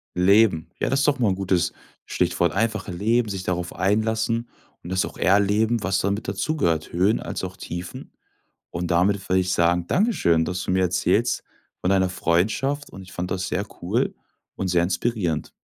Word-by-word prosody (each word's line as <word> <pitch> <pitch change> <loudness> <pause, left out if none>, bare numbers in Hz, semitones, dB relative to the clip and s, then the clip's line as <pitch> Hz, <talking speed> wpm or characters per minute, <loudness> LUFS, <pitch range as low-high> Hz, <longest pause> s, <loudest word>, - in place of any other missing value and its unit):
Leben. 95 -2 +4
Ja, - - 0
das 135 - +2
ist 140 - +2
doch 140 - +2
mal 115 - +2
'n - - +1
gutes 95 -2 0 0.3
Stichwort, 85 -2 0
einfach 110 -1 -1
Leben, 110 +6 +1
sich 95 -2 -4
darauf 90 -1 -2
einlassen 110 +4 0 0.3
und 90 - -8
das 95 - +1
auch - - -10
erleben, 105 +3 +2
was 95 -1 +1
damit 100 +2 -2
dazugehört, 95 - -1
Höhen 95 +6 +2
als - - -4
auch 95 +1 -6
Tiefen. 90 0 -7 0.6
Und 85 +1 -4
damit 95 +3 +2
würde 95 +1 +3
ich 90 0 -1
sagen, 85 +1 +2
dankeschön, 130 - +2
dass 90 +1 -3
du - - -3
mir 95 0 +2
erzählst 90 +6 +1 0.4
von 90 - 0
deiner 95 -1 +3
Freundschaft 110 +12 0
und 95 - -10
ich 90 -1 -13
fand 90 +1 -4
das 90 -1 -2
sehr - - -2 0.2
cool - - 0 0.4
und 95 - -3
sehr 85 -1 +3
inspirierend. 90 -3 -1
95 Hz, 180 wpm, -23 LUFS, 90-110 Hz, 0.6 s, Leben